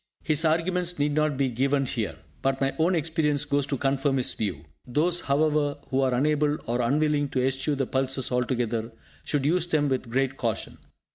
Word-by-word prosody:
His 155 0 +2
arguments 175 +2 +1
need 145 0 +1
not 150 -1 +1
be 135 -2 +1
given 135 +3 +1
here, 110 -10 -3 0.2
but 135 0 0
my 135 0 0
own 175 +3 +3
experience 155 -3 +1
goes 145 -1 0
to 140 - -1
confirm 135 +1 +1
his 125 - +2
view. 90 -8 -3 0.2
Those, 165 +7 +2
however, 145 0 +1
who 135 +1 +2
are 130 -2 +2
unable 150 +2 +1
or 120 +2 -1
unwilling 145 +3 +1
to 130 -1 0
eschew 135 +3 0
the 135 -1 -1
pulses 130 0 -1
altogether, 120 -2 -1 0.3
should 145 -2 -1
use 175 +3 +2
them 150 -4 +1
with 130 -2 -2
great 135 +2 0
caution. 115 -4 -3
140 Hz, 185 wpm, -26 LUFS, 130-150 Hz, 0.3 s, own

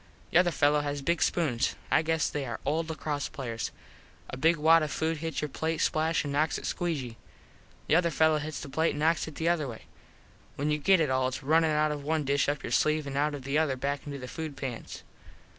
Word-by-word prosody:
The - - +6
other 175 0 +4
fellos 145 -1 +3
has 145 -1 -3
big 170 +4 +1
spoons. 145 -9 +1 0.2
I - - +5
guess 160 0 +1
they 145 - -3
are 120 - -4
old 160 +3 0
Lacross 150 -2 -3
players. 115 -4 -4 0.6
A - - -4
big 160 +6 +3
wad 160 +2 +5
of 155 - -1
food 160 0 -1
hits 160 0 -3
your - - 0
plate 160 +3 -2
splash 160 +1 +1
an 145 - -3
knocks 150 +3 +1
it - - -8
squee 175 -2 -1
gee. 120 -3 -7 0.7
The 160 - +4
other 175 -1 +2
fello 160 0 +3
hits 150 0 -5
the - - -7
other 135 - -13
plate 160 +1 +2
an 145 - -5
knocks 160 +2 +2
it 155 - -9
the 165 - -2
other 170 -4 +1
way. 115 -3 -8 0.7
When 145 +2 -1
you 150 - +1
get 190 +3 +4
it 150 -4 +1
all 130 0 +2
its 130 +1 -5
runnin 160 +3 +3
out 150 0 +2
of 145 -1 -4
one 155 +1 0
dish 140 +1 +2
up 145 - -2
your - - -5
sleeve 155 0 +2
an 140 -1 -5
out 145 +1 +1
of 140 - -8
the 140 +3 +1
other 150 -4 +1
back 140 +2 -3
into 140 -1 -5
the 125 -1 -7
food 155 -1 -6
pans. 125 -4 -6
150 Hz, 245 wpm, -29 LUFS, 140-160 Hz, 0.7 s, The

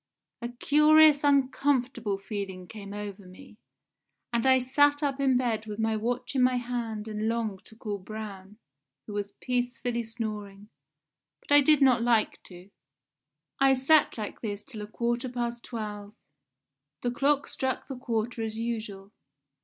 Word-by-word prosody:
"A 235 - -3
curious 300 +3 +5
uncomfortable 260 -6 +1
feeling 195 -3 -6
came 200 -1 -9
over 205 -2 -7
me, 185 +4 -15 0.7
and 235 +2 +1
I 260 0 +6
sat 290 +3 +3
up 280 -1 0
in 265 -2 +3
bed 225 -3 -1
with 210 -1 -5
my 220 0 +1
watch 240 +5 -2
in 265 - +2
my 250 0 +4
hand 235 -3 -4
and 215 0 -2
longed 225 -4 -3
to 220 - -15
call 210 -2 -5
Braun, 205 0 -8 0.5
who 210 - -8
was 205 0 -4
peacefully 245 -1 -2
snoring, 210 -3 -6 0.7
but - - -14
I 290 0 +8
did 295 0 +5
not 250 -3 +5
like 230 -2 +2
to. 180 +2 -13 0.9
I 270 0 +5
sat 280 +3 +4
like 210 -2 -6
this 205 -2 -4
till 220 -2 -8
a 210 - -6
quarter 240 +3 -2
past 240 -1 -3
twelve; 210 -3 -6 0.9
the 245 - 0
clock 280 +3 +1
struck 260 -1 -2
the 270 - -5
quarter 235 -2 -2
as 220 -1 -3
usual. 220 -4 -4
235 Hz, 155 wpm, -28 LUFS, 210-255 Hz, 0.9 s, I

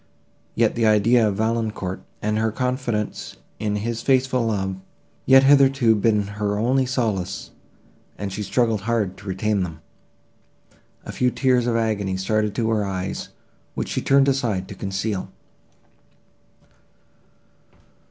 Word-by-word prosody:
Yet - - +2
the 115 -1 +1
idea 110 +2 +4
of 100 - -1
Valancourt, 110 -3 -2 0.2
and 105 +1 0
her 110 0 +1
confidence 125 -3 -3 0.2
in 105 -1 -1
his 115 +2 -3
faithful 130 -2 +2
love, 95 -3 -2 0.5
had 135 0 +8
hitherto 135 -4 +5
been 105 0 +2 0.2
her 105 0 0
only 130 +4 +1
solace, 105 -8 -2 0.7
and 100 -1 -5
she 105 - -4
struggled 115 -1 +1
hard 105 -3 -1
to - - -13
retain 100 +2 0
them. 80 -3 -4 1.3
A - - -6
few 125 - +1
tears 125 -2 +1
of 120 - +1
agony 105 -4 0
started 105 +2 0
to 115 -1 0
her 110 -2 +1
eyes, 95 -1 -4 0.5
which - - -3
she - - -2
turned 140 0 +4
aside 115 -9 0
to - - -6
conceal. 100 +1 -3
110 Hz, 135 wpm, -22 LUFS, 100-120 Hz, 1.3 s, had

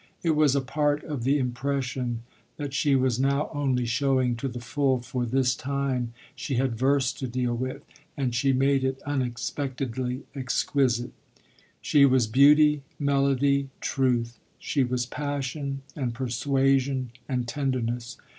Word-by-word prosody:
It 165 - +3
was 150 -3 +4
a 140 - +2
part 145 +2 0
of 140 -6 -4
the 140 +2 +3
impression 125 -2 -2 0.3
that 145 -2 -5
she 140 0 +2
was 130 -2 +1
now 140 +2 +1
only 135 -4 0
showing 130 0 +1
to 135 - -3
the 120 -1 -5
full, 130 +3 0
for 125 0 -3
this 125 +1 +2
time 130 -3 -2 0.2
she 140 -1 -3
had 125 -1 +1
verse 135 +1 +2
to 130 - -5
deal 120 0 -1
with 130 +4 -4 0.3
and 130 -4 -1
she 135 +3 +2
made 135 +1 +2
it 130 0 -1
unexpectedly 130 -1 -3
exquisite. 130 -2 0 0.7
She 140 -2 +5
was 130 -3 +3
beauty, 145 +5 +5 0.2
melody, 140 -1 +2
truth; 120 -4 0 0.2
she 140 - 0
was 125 0 -1
passion 140 0 -4
and 125 -5 -2
persuasion 135 +1 +1 0.2
and 125 -2 -1
tenderness. 125 -2 -2
130 Hz, 140 wpm, -26 LUFS, 125-140 Hz, 0.7 s, She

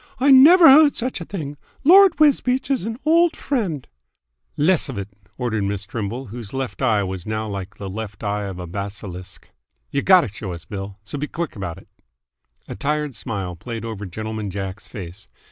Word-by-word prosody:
"I 275 +2 +4
never 325 +6 +9
heard 300 +3 +9
of - - -8
such 250 -6 -2
a - - -6
thing! 150 -7 -6 0.3
Lord 380 +4 +7
Wisbeach 275 -3 +3
is 260 -7 0
an 225 0 -4
old 335 +1 +4
friend 190 - -2 0.4
" - - -49
"Less'f 150 - +1
it!" 100 0 -5 0.3
ordered 110 -5 -1
Miss 100 0 -3
Trimble, 115 +5 -4
whose 115 +1 -8
left 135 0 -4
eye 110 -6 +2
was 95 -1 -5
now 110 0 -2
like 100 -1 -6
the 100 - -6
left 100 +1 -7
eye 105 0 -2
of 95 -2 -6
a 90 - -6
basilisk. 95 0 -7 0.4
"Y' 140 - 0
gotta 185 -2 +5
show 100 -2 -7
us, 85 -1 -10
Bill, 100 -1 -7
so 140 +7 -6
b' 150 - -2
quick 170 0 -4
'bout 95 -5 -6
't!" - - -15 0.8
A - - -6
tired 150 +6 -2
smile 100 -7 -4
played 115 +5 -6
over 105 -3 -6
Gentleman 110 +2 -5
Jack's 95 +1 -6
face. 95 -2 -9
110 Hz, 190 wpm, -21 LUFS, -, 0.8 s, never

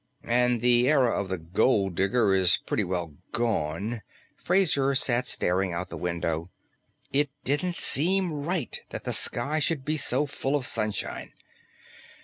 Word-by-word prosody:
"And 125 0 +2
the 120 +1 +3
era 135 -6 +3
of 100 -2 -2
the 95 - -2
gold 95 +4 +1
digger 100 +3 +1
is 95 -2 +5
pretty - - 0
well 85 -4 -4 0.2
gone 110 -1 -2 0.2
" - - -33
Fraser 150 -7 +3
sat 125 -2 +2
staring 90 0 0
out 85 +2 -5
the - - -5
window. 85 -1 -3 0.6
It 145 +1 +1
didn't 150 +6 -1
seem 180 +4 +2
right 150 0 -2
that - - -7
the - - -3
sky 155 +2 0
should 150 -2 0
be 155 +2 0
so 135 +1 +1
full 135 0 -2
of 140 -3 -1
sunshine. 110 -3 -3
120 Hz, 150 wpm, -26 LUFS, 95-145 Hz, 0.6 s, is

